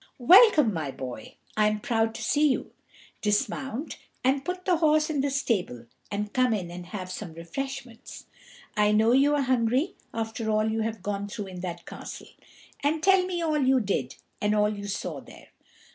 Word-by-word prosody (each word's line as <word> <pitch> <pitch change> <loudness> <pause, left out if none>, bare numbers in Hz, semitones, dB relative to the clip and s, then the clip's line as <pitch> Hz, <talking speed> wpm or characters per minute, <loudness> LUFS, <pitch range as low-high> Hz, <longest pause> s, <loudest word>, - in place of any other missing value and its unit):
"Welcome, 305 - +7
my 155 -5 -3
boy; 125 -4 -7 0.2
I 215 0 +4
am 215 0 0
proud 225 -1 0
to - - -5
see 300 +1 +3
you. 260 - -1 0.5
Dismount 255 +6 -2 0.2
and 270 +2 +2
put 360 +4 -4
the 360 -3 +3
horse 310 -1 +3
in 290 -3 0
the 280 - 0
stable, 200 - -1 0.2
and 205 0 -3
come 255 -3 +3
in 175 -4 -5
and 175 0 -8
have 185 -1 -6
some 175 -2 -6
refreshments; 235 +8 -7 0.5
I 210 0 +3
know 220 +2 +4
you 280 +3 +4
are 285 - +1
hungry 255 +7 +1 0.2
after 225 0 -3
all 215 0 +2
you 225 0 -1
have 220 -3 -3
gone 200 0 -3
through 205 -1 -6
in 180 -1 -8
that 175 -1 -6
castle. - - -9 0.5
And 310 +2 0
tell 385 -1 +5
me 350 -2 -2
all 310 -2 +1
you 260 0 +4
did, 190 - -2 0.3
and 210 0 +2
all 210 0 +2
you 200 0 -6
saw 200 - -4
there. - - -15
225 Hz, 185 wpm, -27 LUFS, 205-275 Hz, 0.5 s, Welcome